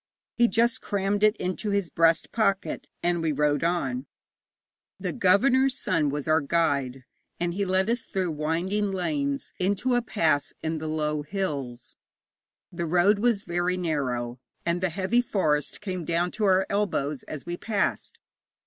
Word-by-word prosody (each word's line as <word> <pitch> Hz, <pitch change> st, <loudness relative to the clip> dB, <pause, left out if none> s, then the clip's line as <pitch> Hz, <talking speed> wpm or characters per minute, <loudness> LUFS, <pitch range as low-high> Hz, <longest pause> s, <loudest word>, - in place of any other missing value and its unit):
He 240 Hz, 0 st, +5 dB
just 235 Hz, +3 st, +2 dB
crammed 200 Hz, 0 st, -1 dB
it 215 Hz, 0 st, +4 dB
into 185 Hz, +4 st, -3 dB
his 200 Hz, -4 st, 0 dB
breast 165 Hz, 0 st, +3 dB
pocket, 195 Hz, -4 st, 0 dB, 0.2 s
and 175 Hz, -1 st, +1 dB
we 160 Hz, -1 st, +1 dB
rode 145 Hz, 0 st, +1 dB
on. 140 Hz, -7 st, -1 dB, 0.9 s
The 185 Hz, -3 st, -3 dB
governor's 260 Hz, +8 st, +3 dB
son 160 Hz, -5 st, +1 dB
was 145 Hz, 0 st, -3 dB
our 155 Hz, 0 st, +4 dB
guide, 140 Hz, -5 st, 0 dB, 0.3 s
and 175 Hz, 0 st, -1 dB
he 200 Hz, +2 st, -1 dB
led 190 Hz, +1 st, +1 dB
us 235 Hz, 0 st, -1 dB
through 185 Hz, -3 st, -2 dB
winding 170 Hz, +7 st, -1 dB
lanes 150 Hz, -7 st, -2 dB
into 200 Hz, +7 st, +1 dB
a 245 Hz, -, +3 dB
pass 165 Hz, -10 st, 0 dB
in 160 Hz, 0 st, -1 dB
the 155 Hz, -, -5 dB
low 150 Hz, -1 st, -1 dB
hills. 145 Hz, -8 st, -4 dB, 0.7 s
The 170 Hz, -1 st, -3 dB
road 180 Hz, +5 st, +4 dB
was 225 Hz, -3 st, +2 dB
very 175 Hz, +1 st, -1 dB
narrow, 130 Hz, -8 st, -2 dB, 0.3 s
and 170 Hz, +1 st, 0 dB
the 185 Hz, -, +1 dB
heavy 195 Hz, +8 st, +1 dB
forest 155 Hz, -, 0 dB
came 185 Hz, -4 st, -4 dB
down 170 Hz, +2 st, 0 dB
to 215 Hz, -, -1 dB
our 190 Hz, -1 st, +4 dB
elbows 155 Hz, -9 st, -1 dB
as 150 Hz, -3 st, -7 dB
we 175 Hz, 0 st, -3 dB
passed. 210 Hz, +3 st, -2 dB
175 Hz, 160 wpm, -26 LUFS, 150-200 Hz, 0.9 s, He